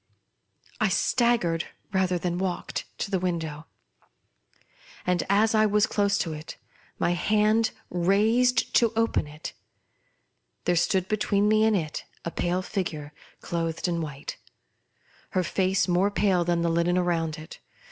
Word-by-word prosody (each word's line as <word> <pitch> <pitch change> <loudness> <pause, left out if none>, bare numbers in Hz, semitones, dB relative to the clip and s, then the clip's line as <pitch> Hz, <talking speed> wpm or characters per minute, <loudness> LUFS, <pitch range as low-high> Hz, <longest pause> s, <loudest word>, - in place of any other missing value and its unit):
I - - +3
staggered, 230 -10 +1 0.3
rather 185 -1 +2
than 175 0 -2
walked, 185 -2 -3
to 205 - -4
the 190 - +1
window; 160 -4 -3 1.4
and, 180 -1 +1
as 215 +3 +3
I 215 0 +4
was 210 +1 +3
close 200 -1 +1
to 165 - -4
it 155 +1 -8 0.2
— - - -30
my - - +1
hand 215 +5 +2 0.2
raised 220 +7 +2
to 235 -2 +4
open 225 -8 +1
it 150 +1 -8 0.5
— - - -47
there 175 - +2
stood 180 +2 +1
between 210 -1 +1
me 215 +1 +4
and 220 -1 +3
it 155 -4 -4 0.2
a 170 - -2
pale 180 +2 -1
figure 155 -7 -4 0.3
clothed 165 0 -2
in 170 -1 -1
white; 150 -3 -6 1.0
her 185 - +3
fiice 190 +2 +1
more 180 +3 +3
pale 195 -3 +2
than 170 0 0
the 170 - +2
linen 170 +2 +2
round 165 -3 0
it. 155 0 -11
180 Hz, 145 wpm, -26 LUFS, 170-210 Hz, 1.4 s, I